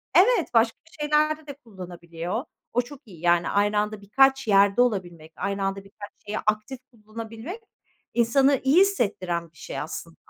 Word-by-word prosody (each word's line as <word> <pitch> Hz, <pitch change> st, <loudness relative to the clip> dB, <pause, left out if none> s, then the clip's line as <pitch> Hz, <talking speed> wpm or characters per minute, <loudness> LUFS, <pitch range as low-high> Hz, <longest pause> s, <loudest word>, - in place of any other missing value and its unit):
Evet, 465 Hz, -, +4 dB
başka 230 Hz, 0 st, +3 dB, 0.2 s
şeylerde 300 Hz, +1 st, +1 dB
de 285 Hz, -, -6 dB
kullanabiliyor. 180 Hz, -, -6 dB, 0.3 s
O 245 Hz, -, +3 dB
çok 265 Hz, +2 st, -12 dB
iyi 175 Hz, -6 st, -13 dB
yani. 175 Hz, 0 st, +3 dB
Aynı 205 Hz, +1 st, +2 dB
anda 210 Hz, 0 st, -2 dB
birkaç 270 Hz, +5 st, +3 dB
yerde 200 Hz, +2 st, +5 dB
olabilmek, 175 Hz, -9 st, -2 dB
aynı 200 Hz, 0 st, -2 dB
anda 195 Hz, 0 st, -2 dB
birkaç 205 Hz, +1 st, -11 dB
şeyi 210 Hz, +1 st, -3 dB
aktif 215 Hz, +4 st, -1 dB
kullanabilmek 225 Hz, -, -8 dB, 0.5 s
insanı 265 Hz, +4 st, +3 dB
iyi 275 Hz, +6 st, +5 dB
hissettiren 185 Hz, -, 0 dB
bir 160 Hz, -, -25 dB
şey -, -, -6 dB
aslında. 165 Hz, +1 st, -6 dB
215 Hz, 150 wpm, -25 LUFS, 195-265 Hz, 0.5 s, yerde